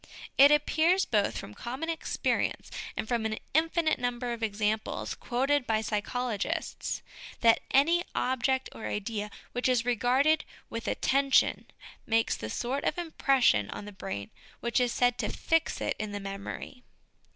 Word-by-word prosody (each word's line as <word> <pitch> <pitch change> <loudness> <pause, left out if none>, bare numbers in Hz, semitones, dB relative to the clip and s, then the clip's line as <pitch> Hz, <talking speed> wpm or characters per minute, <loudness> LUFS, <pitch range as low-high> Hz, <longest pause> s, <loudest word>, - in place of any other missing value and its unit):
It 280 +1 +8
appears, 320 +5 +3
both 210 -3 +1
from 105 - -7
common 260 - -5
experience 330 -1 -1 0.3
and - - -2
from 235 -1 0
an 220 0 -1 0.2
infinite 325 +1 +2
number 245 0 -2
of 235 - -7
examples 215 0 -1
quoted 270 +2 0
by 220 -1 +2
psychologists, 220 +1 -2 0.4
that 230 -1 +6
any 330 +6 +4
object 260 +1 +1
or - - -6
idea 210 0 -3 0.2
which 245 +1 0
is 245 -2 +2
regarded 255 +6 +3 0.3
with 230 0 -5
attention 275 0 +2 0.4
makes 225 0 +2
the 110 - -6
sort 260 - -2
of - - 0
impression 270 - +2
on 205 - -6
the 205 - -8
brain 185 - -6 0.3
which 235 +2 0
is 245 -1 +2
said 245 0 +2
to - - -1
fix 325 -1 0
it - - 0
in 210 -1 -4
the 205 - -3
memory. 195 +5 -7
245 Hz, 150 wpm, -29 LUFS, 215-275 Hz, 0.4 s, It